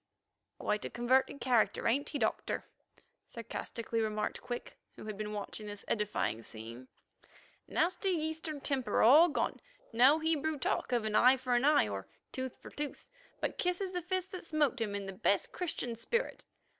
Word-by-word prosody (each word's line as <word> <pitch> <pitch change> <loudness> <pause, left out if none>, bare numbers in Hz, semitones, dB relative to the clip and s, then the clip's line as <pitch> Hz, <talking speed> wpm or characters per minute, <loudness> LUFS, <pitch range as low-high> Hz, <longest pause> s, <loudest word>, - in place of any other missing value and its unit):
"Quite 210 0 -1
a - - -3
converted 260 +3 +2
character, 245 -4 +2
ain't 270 +5 +1
he, - - -2
Doctor?" 220 -5 -1 0.6
sarcastically 230 -1 -4
remarked 215 -1 -2
Quick, 240 -1 -6 0.2
who - - -10
had 215 -1 -4
been 210 +1 -4
watching 210 +1 -5
this 205 -1 -7
edifying 210 - 0
scene. 115 +3 -8 0.8
"Nasty 360 +4 +1
Eastern 315 -3 -2
temper 270 -4 +1
all 300 +10 +8
gone; 295 - -1 0.3
no 260 +6 +6
Hebrew 315 -1 0
talk 255 - -1
of 240 -3 +1
eye 245 +5 +5
for 255 -1 -1
eye 265 - +4
or 100 -2 -5 0.2
tooth 260 -1 -4
for - - -11
tooth, 295 -1 -5 0.3
but - - -3
kisses 360 +1 0
the 360 -1 -2
fist 370 +1 -2
that 370 - -6
smote 295 -6 +1
him 205 -2 -1
in 200 -1 -3
the 195 - -5
best 195 +1 +1
Christian 280 -9 -3
spirit. 470 - -2
255 Hz, 160 wpm, -33 LUFS, 215-315 Hz, 0.8 s, all